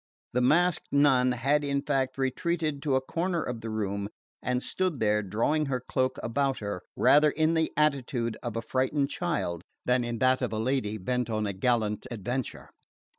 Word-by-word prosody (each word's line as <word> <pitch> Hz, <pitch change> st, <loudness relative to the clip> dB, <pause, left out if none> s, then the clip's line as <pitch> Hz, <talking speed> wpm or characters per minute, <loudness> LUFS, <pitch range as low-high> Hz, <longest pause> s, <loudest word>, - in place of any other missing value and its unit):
The 125 Hz, -, +2 dB
masked 175 Hz, +7 st, +3 dB
nun 135 Hz, -3 st, +4 dB
had 140 Hz, +5 st, +1 dB
in 140 Hz, -1 st, -1 dB
fact 135 Hz, -2 st, 0 dB
retreated 150 Hz, +2 st, -1 dB
to 140 Hz, -3 st, +1 dB
a 130 Hz, -, +2 dB
corner 170 Hz, +4 st, -1 dB
of 120 Hz, -2 st, -5 dB
the 115 Hz, -, -5 dB
room 100 Hz, -2 st, -2 dB, 0.3 s
and 125 Hz, 0 st, -1 dB
stood 185 Hz, -7 st, -1 dB
there, 105 Hz, -1 st, +2 dB
drawing 120 Hz, +10 st, 0 dB
her 130 Hz, -2 st, -1 dB
cloak 130 Hz, +1 st, -1 dB
about 135 Hz, +4 st, 0 dB
her, 100 Hz, -3 st, -4 dB
rather 145 Hz, +4 st, +5 dB
in 155 Hz, +2 st, +1 dB
the 160 Hz, -1 st, +1 dB
attitude 135 Hz, -6 st, +1 dB
of 120 Hz, -3 st, -4 dB
a 115 Hz, -, -2 dB
frightened 140 Hz, +3 st, 0 dB
child 150 Hz, -, -2 dB, 0.2 s
than 125 Hz, 0 st, +2 dB
in 120 Hz, 0 st, -3 dB
that 130 Hz, +2 st, +3 dB
of 125 Hz, -, -1 dB
a -, -, -1 dB
lady 110 Hz, -2 st, 0 dB
bent 125 Hz, +4 st, -1 dB
on 110 Hz, -1 st, -1 dB
a 100 Hz, -, -2 dB
gallant 105 Hz, 0 st, 0 dB
adventure. 120 Hz, +3 st, -4 dB
130 Hz, 180 wpm, -28 LUFS, 115-145 Hz, 0.3 s, rather